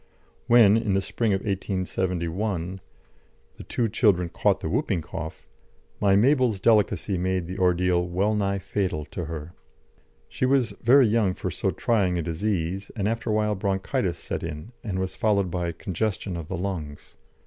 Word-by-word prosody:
When, 115 -3 +7
in 105 -4 0
the - - +3
spring 110 +3 -1
of 95 -1 +1
1871, 95 -1 -2 0.8
the - - -9
two 120 - -1
children 100 -5 +2
caught - - +1
the - - -3
whooping 85 -4 0
cough, 80 +1 -7 0.5
my 100 -1 +4
Mabel's 125 -1 +3
delicacy 105 -3 +2
made 95 -1 0
the 90 +3 -6
ordeal 90 -1 +2
well 95 +5 +1
nigh 100 -2 0
fatal 95 -6 -2
to 90 - -4
her. 80 +1 -7 0.7
She 130 - -1
was 130 -3 +2
very 130 +3 +6
young 105 -4 +2
for - - -4
so - - -1
trying 95 -6 +1
a 85 - -1
disease, 90 +2 -2
and 100 -3 -1
after 115 +1 -2
a - - +2
while 105 0 +1
bronchitis 95 - -1
set - - -5
in 75 +10 -6
and 100 -4 -3
was 95 0 -3
followed 100 -4 +1
by 85 -1 -1
congestion 95 +1 -3
of 85 -2 -6
the 95 - -4
lungs. 85 -6 -5
95 Hz, 165 wpm, -25 LUFS, 90-105 Hz, 0.8 s, When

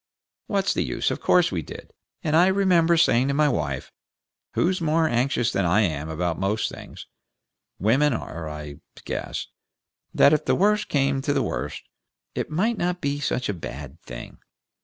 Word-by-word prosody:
What's 195 -2 +1
the - - 0
use? - - -1
Of - - -4
course 180 -2 +4
we 90 -4 -2
did, - - -11 0.3
and 155 0 +1
I 175 +3 +6
remember 180 -4 +3
saying 130 -5 +4
to 140 - 0
my 150 +1 +4
wife, 70 - -2 0.6
who's 185 0 +1
more 160 0 +2
anxious 120 -2 +1
than 100 - 0
I 90 +5 +3
am 80 -6 -1
about 85 +1 -2
most 100 +3 0
things - - -10 0.7
women 130 +9 +3
are, 85 -9 -5
I 75 -2 -7 0.3
guess - - -4 0.7
that 140 - +5
if 155 - +1
the - - +2
worst 210 +2 +2
came 135 -1 +1
to 145 +1 0
the 140 - +1
worst, - - -4 0.5
it - - -3
might 205 +8 0
not 180 0 -1
be 140 -1 -2
such 130 -3 -1
a 105 - -1
bad 70 -3 -8
thing. - - -9
135 Hz, 175 wpm, -24 LUFS, -, 0.7 s, I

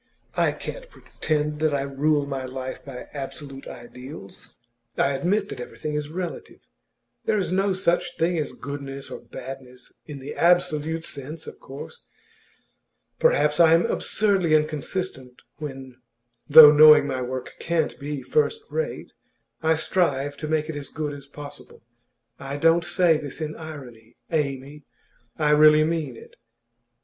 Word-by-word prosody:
I - - +3
can't - - -8
pretend 150 - -3
that 155 -2 +2
I 135 - 0
rule 145 +2 +1
my 135 -2 -4
life 130 0 -6
by 130 -3 -9
absolute 140 -1 -7
ideals; 125 -2 -11 0.4
I 140 - +3
admit 195 +8 0
that 125 - -7
everything 150 +4 -6
is 150 0 -2
relative. 175 +1 -6 0.6
There 215 - +2
is 185 -4 -1
no 195 +1 +1
such 175 -1 0
thing 170 +2 +1
as 150 - -2
goodness 140 -1 -7
or - - -6
badness, 130 -1 -10
in 150 -2 -7
the 135 +1 -7
absolute 165 -2 +2
sense, 150 +3 -8
of - - -10
course. 145 - -10 1.1
Perhaps 150 - +3
I 165 -1 +7
am 170 - +2
absurdly 195 -7 +1
inconsistent 150 -3 -3
when 135 -4 -8 0.5
though 150 0 +11
knowing 150 0 +8
my 130 -2 -2
work 125 0 -5
can't 165 -2 -1
be 145 -1 -5
first 455 0 +1
rate 480 - -3 0.5
I 160 0 +3
strive 145 -4 0
to 155 - -5
make 155 0 0
it 160 - -5
as 145 -1 -6
good 150 -1 -4
as 140 -1 -10
possible. 145 0 -12 0.6
I 140 +1 -5
don't 165 +3 +4
say 175 -4 +3
this 145 0 -7
in 155 -1 -4
irony, 125 -8 -10 0.2
Amy; 145 -1 -2 0.5
I 150 -1 +2
really 150 0 +7
mean 155 -6 -2
it. - - -15
150 Hz, 145 wpm, -24 LUFS, 135-160 Hz, 1.1 s, though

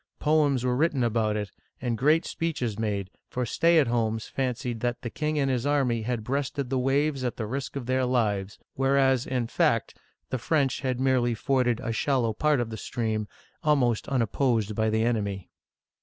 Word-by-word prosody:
Poems 145 -4 +2
were 125 -1 +1
written 145 -2 +1
about 110 -2 +1
it, 105 -1 -4 0.3
and 120 -2 -1
great 150 +8 +3
speeches 135 - -2
made, 100 -3 -2 0.2
for 125 0 -2
stay 165 +8 +3
at 155 - +5
homes 115 -2 0
fancied 125 -2 -3
that 120 +1 -2
the 120 - -4
king 155 0 -2
and 140 -2 +2
his 125 -2 0
army 135 -5 +1
had 115 0 -2
breasted 135 +1 -2
the 130 - +1
waves 135 +1 +1
at 125 - -2
the 110 - -2
risk 130 +6 -4
of 135 -3 -4
their 130 +1 +1
lives, 105 -6 0 0.2
whereas, 135 -1 +2
in 125 -2 -1
fact, - - +1 0.4
the 130 - -1
French 135 0 +1
had 130 -2 -1
merely 130 -3 +2
forded 125 0 +1
a 115 - -2
shallow 120 -3 +1
part 150 +4 +2
of 115 -2 -2
the 110 - -5
stream, 110 -3 -2 0.4
almost 130 -7 +2
unopposed 115 -3 +1
by 110 +1 +1
the 110 +1 +1
enemy. 100 -5 -2
125 Hz, 185 wpm, -27 LUFS, 115-135 Hz, 0.4 s, at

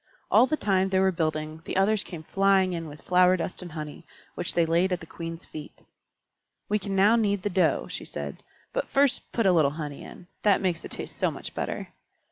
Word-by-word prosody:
All 255 - +6
the 310 - 0
time 190 -4 +2
they 190 - +1
were 190 0 +4
building, 155 -2 -2
the - - -3
others 200 +2 +3
came 170 -4 -8
flying 195 +1 +3
in 165 -1 -4
with 150 0 -11
flower 180 0 +4
dust 180 +2 -4
and 175 -3 -8
honey, 150 0 -7 0.3
which 175 - -4
they 170 - +4
laid 170 +3 +2
at 180 - 0
the - - -10
Queen's 165 +1 -7
feet. 155 -1 -10 0.8
"We 210 +1 +1
can 195 0 -4
now 205 +4 +5
knead 205 -4 +1
the 205 - -1
dough," 175 -5 +2
she - - -6
said. 70 -1 -6 0.3
"But - - -2
first 275 -1 +2
put 230 - 0
a 190 - +6
little 160 -5 +4
honey 150 -3 -5
in - - -11 0.2
that 205 -2 +4
makes 180 -4 -1
it - - -7
taste - - -6
so - - +3
much - - -7
better." - - -4
180 Hz, 220 wpm, -27 LUFS, 160-195 Hz, 0.8 s, All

